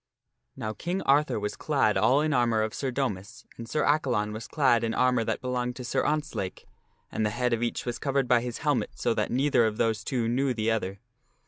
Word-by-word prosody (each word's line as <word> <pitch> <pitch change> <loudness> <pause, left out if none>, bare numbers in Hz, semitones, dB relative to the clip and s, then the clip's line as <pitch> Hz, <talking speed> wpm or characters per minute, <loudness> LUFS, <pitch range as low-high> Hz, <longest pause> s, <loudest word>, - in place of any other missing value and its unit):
Now 110 0 -4
King 180 - -3
Arthur 135 -4 +3
was 105 0 -3
clad 135 -8 +1
all 135 +3 +4
in 155 -1 +1
armor 120 -4 +2
of 110 - -3
Sir 135 - -2
Domas, 110 -5 -4
and 115 -1 -9
Sir 150 - 0
Accalon 125 -8 +1
was 110 +1 -6
clad 120 -6 +2
in 115 0 -1
armor 125 -2 +3
that - - -2
belonged 125 -1 -2
to 125 - -7
Sir 130 +2 0
Ontzlake, 150 -11 -2 0.5
and 110 - -1
the 105 - +2
head 120 +2 0
of 115 - 0
each 120 - -2
was 120 -2 -3
covered 135 -2 0
by 120 -1 +4
his 120 -1 -4
helmet 140 -8 +1
so - - 0
that - - -1
neither 135 -1 +3
of 110 -1 -3
those 110 -2 0
two 120 -4 -1
knew 130 +2 +1
the 110 0 0
other. 100 -3 -2
120 Hz, 220 wpm, -27 LUFS, 110-135 Hz, 0.5 s, all